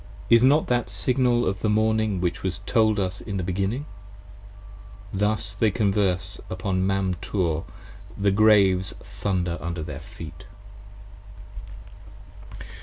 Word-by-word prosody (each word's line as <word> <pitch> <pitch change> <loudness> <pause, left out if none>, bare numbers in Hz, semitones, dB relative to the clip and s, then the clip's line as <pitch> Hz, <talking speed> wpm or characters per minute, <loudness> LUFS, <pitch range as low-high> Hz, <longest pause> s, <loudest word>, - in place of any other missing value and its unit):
Is 115 -1 +7
it 130 - +6
not 150 +3 +4
that 120 -5 0
Signal 120 +5 +2
of 95 0 -1
the 110 - 0
Morning 110 -2 +1
which 90 -1 -1
was 95 +1 -3
told 110 +1 +2
us 95 0 -2
in 100 -3 -5
the 90 - -2
Beginning? 95 +9 -2 1.3
27 95 - -4
Thus 105 -1 0
they 110 +3 +2
converse 100 -3 0
upon 95 0 -1
Mam 95 -1 0
Tor, 85 -5 -1 0.5
the 100 0 +2
Graves 100 -3 +4
thunder 90 -4 -2
under 85 -1 -4
their - - -6
feet. - - -11
100 Hz, 130 wpm, -24 LUFS, 95-110 Hz, 1.3 s, Is